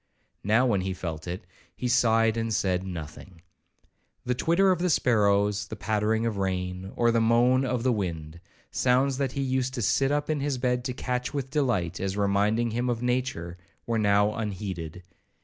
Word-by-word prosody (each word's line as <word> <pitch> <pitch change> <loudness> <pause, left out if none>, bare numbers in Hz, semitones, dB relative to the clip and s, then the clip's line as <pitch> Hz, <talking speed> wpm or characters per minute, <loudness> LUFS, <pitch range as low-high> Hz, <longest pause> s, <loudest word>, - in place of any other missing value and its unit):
Now 110 +5 +3
when 105 -7 +2
he 95 0 -3
felt 80 -3 -6
it, 90 +1 -5 0.3
he 125 - -3
sighed 115 -2 +3
and 115 0 -2
said 95 -3 0
nothing. 85 +1 -8 0.8
The 125 - +1
twitter 170 +9 +3
of 180 - +1
the 180 +1 +1
sparrows, 105 -7 +2
the 110 - -6
pattering 110 +1 0
of 110 -3 -1
rain, 95 0 -3
or 120 -1 +3
the 115 0 +2
moan 120 +3 +4
of 125 -2 -1
the 130 - +3
wind, 85 -6 -4 0.3
sounds 130 +2 +2
that 135 -2 -1
he 140 - -2
used 130 0 -1
to 120 - -2
sit 135 +8 +2
up 145 0 0
in 155 -2 0
his 140 -1 -1
bed 125 -1 0
to 130 - -2
catch 125 +1 -3
with 135 -1 -3
delight, 120 - 0
as 95 +1 -2
reminding 105 +3 +1
him 120 +3 -1
of 120 0 -2
nature, 125 -9 -2 0.3
were 115 -1 0
now 105 0 +3
unheeded. 95 -6 -5
115 Hz, 185 wpm, -27 LUFS, 95-125 Hz, 0.8 s, moan